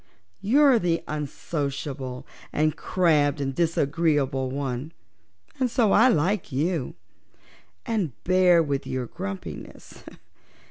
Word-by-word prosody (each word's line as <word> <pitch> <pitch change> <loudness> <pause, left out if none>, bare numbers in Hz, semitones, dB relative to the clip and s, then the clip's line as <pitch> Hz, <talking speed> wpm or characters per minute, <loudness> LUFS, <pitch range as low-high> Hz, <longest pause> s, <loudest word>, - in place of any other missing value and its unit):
You're 265 +4 +5
the 170 -4 0
unsociable 140 -3 -4 0.3
and 155 0 +1
crabbed 150 -5 +2
and 135 -1 -2
disagreeable 145 -4 +1
one, 135 +2 -4 0.7
and 255 -2 +1
so 230 -4 +2
I 230 +4 +6
like 190 -3 +1
you, 150 +1 -1 0.9
and 205 - -1
bear 180 -2 +4
with 140 -3 -3
your 130 -1 -2
grumpiness. 100 -4 -8
155 Hz, 100 wpm, -25 LUFS, 135-180 Hz, 0.9 s, I